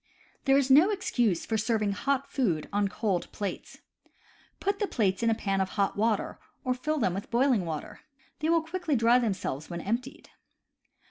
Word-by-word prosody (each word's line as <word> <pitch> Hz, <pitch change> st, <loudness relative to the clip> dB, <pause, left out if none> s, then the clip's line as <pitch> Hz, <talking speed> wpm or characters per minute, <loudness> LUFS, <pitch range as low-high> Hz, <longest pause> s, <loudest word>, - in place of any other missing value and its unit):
There 270 Hz, -1 st, +5 dB
is 275 Hz, -1 st, +2 dB
no 310 Hz, +9 st, +7 dB
excuse 240 Hz, -, 0 dB
for 220 Hz, -1 st, -1 dB
serving 215 Hz, -2 st, +1 dB
hot 275 Hz, +7 st, -1 dB
food 180 Hz, -, 0 dB
on 205 Hz, 0 st, +2 dB
cold 195 Hz, -2 st, -2 dB
plates. 200 Hz, -2 st, -6 dB, 0.8 s
Put 400 Hz, 0 st, -1 dB
the 415 Hz, -, 0 dB
plates 195 Hz, -, 0 dB
in 230 Hz, -, +2 dB
a 225 Hz, -, +2 dB
pan 195 Hz, -2 st, -1 dB
of 190 Hz, -, -1 dB
hot 200 Hz, -1 st, +1 dB
water, 215 Hz, 0 st, 0 dB, 0.2 s
or 255 Hz, -2 st, +1 dB
fill 305 Hz, +5 st, -2 dB
them 205 Hz, -10 st, +1 dB
with 195 Hz, +2 st, -5 dB
boiling 240 Hz, -5 st, +2 dB
water. 155 Hz, -2 st, -5 dB, 0.4 s
They 310 Hz, -, 0 dB
will 335 Hz, -1 st, +3 dB
quickly 330 Hz, -2 st, -2 dB
dry 235 Hz, +1 st, +5 dB
themselves 190 Hz, -, -3 dB
when 170 Hz, -1 st, -4 dB
emptied. 230 Hz, +8 st, -4 dB
230 Hz, 180 wpm, -28 LUFS, 195-275 Hz, 0.8 s, no